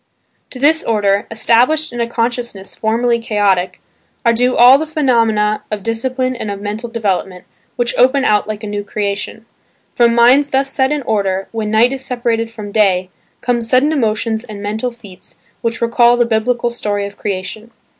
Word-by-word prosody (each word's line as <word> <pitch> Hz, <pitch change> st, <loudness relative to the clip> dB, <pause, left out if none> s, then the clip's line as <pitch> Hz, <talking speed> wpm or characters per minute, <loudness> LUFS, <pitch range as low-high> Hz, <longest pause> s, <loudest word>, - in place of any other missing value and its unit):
To -, -, -9 dB
this 305 Hz, +5 st, +3 dB
order, 205 Hz, -2 st, +1 dB
established 245 Hz, +7 st, +2 dB
in 240 Hz, -, -3 dB
a 235 Hz, -, -1 dB
consciousness 235 Hz, -4 st, -3 dB
formerly 235 Hz, +2 st, 0 dB
chaotic, 205 Hz, -5 st, 0 dB, 0.5 s
are 235 Hz, -, +4 dB
due 250 Hz, +2 st, +1 dB
all 250 Hz, +3 st, +7 dB
the 315 Hz, -, -3 dB
phenomena 230 Hz, -8 st, +1 dB
of 210 Hz, -2 st, -4 dB
discipline 255 Hz, +3 st, -2 dB
and 220 Hz, -3 st, -5 dB
of 200 Hz, -1 st, -5 dB
mental 210 Hz, +3 st, -5 dB
development, 195 Hz, -5 st, -2 dB, 0.3 s
which 240 Hz, 0 st, -1 dB
open 265 Hz, +2 st, +4 dB
out 210 Hz, -1 st, +2 dB
like 215 Hz, 0 st, -5 dB
a -, -, -4 dB
new 205 Hz, 0 st, -4 dB
Creation. 205 Hz, +2 st, -4 dB, 0.5 s
From 235 Hz, -1 st, +3 dB
minds 255 Hz, +5 st, +5 dB
thus 270 Hz, 0 st, 0 dB
set 265 Hz, 0 st, +1 dB
in 295 Hz, -2 st, -1 dB
order, 195 Hz, -4 st, -1 dB
when 220 Hz, -2 st, -3 dB
"night 225 Hz, +4 st, +3 dB
is 265 Hz, -1 st, -6 dB
separated 235 Hz, -3 st, -1 dB
from 215 Hz, -3 st, -9 dB
day" 190 Hz, -4 st, +1 dB, 0.3 s
come 245 Hz, -1 st, 0 dB
sudden 255 Hz, +6 st, +2 dB
emotions 220 Hz, -4 st, -1 dB
and 215 Hz, -4 st, -9 dB
mental 215 Hz, +4 st, -2 dB
feats 200 Hz, -8 st, -13 dB, 0.2 s
which 230 Hz, 0 st, -3 dB
recall 235 Hz, +1 st, +4 dB
the 240 Hz, -, +3 dB
Biblical 235 Hz, +1 st, 0 dB
story 205 Hz, -3 st, -2 dB
of 200 Hz, 0 st, -8 dB
Creation. 205 Hz, +3 st, -5 dB
230 Hz, 175 wpm, -16 LUFS, 210-245 Hz, 0.5 s, all